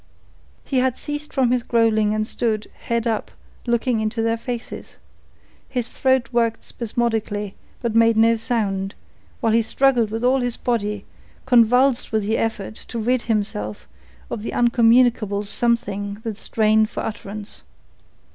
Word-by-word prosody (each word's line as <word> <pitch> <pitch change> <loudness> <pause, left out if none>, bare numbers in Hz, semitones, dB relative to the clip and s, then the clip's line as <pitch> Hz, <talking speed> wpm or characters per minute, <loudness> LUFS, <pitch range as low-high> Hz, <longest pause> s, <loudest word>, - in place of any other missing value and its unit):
He 265 - +1
had 255 -1 +1
ceased 295 0 -6
from 260 -3 +2
his 250 -1 +2
growling 225 -3 +2
and 215 0 0
stood, 215 -1 -2
head 235 0 0
up, 225 -2 -1 0.4
looking 235 0 +1
into 220 +1 -1
their 230 0 +2
faces. 235 0 -6 0.7
His 245 -2 -2
throat 260 -1 +1
worked 230 -2 +1
spasmodically, 220 -3 -2 0.3
but 235 -2 0
made 230 0 +4
no 230 +1 +5
sound, 200 -4 -2 0.5
while 225 -1 +2
he 230 - +5
struggled 245 -1 +2
with 225 +2 -4
all 260 +2 +3
his 245 -2 -2
body, 210 -4 -2 0.4
convulsed 250 +1 +4
with 220 -1 +1
the 220 +3 0
effort 220 -3 -2
to 235 - -6
rid 245 +2 +1
himself 200 - -2 0.4
of 210 - -3
the 225 - -5
incommunicable 235 -3 +3
something 205 -2 -1
that 225 -2 -3
strained 215 0 +2
for - - -4
utterance. 210 -1 -7
230 Hz, 145 wpm, -22 LUFS, 215-240 Hz, 0.7 s, no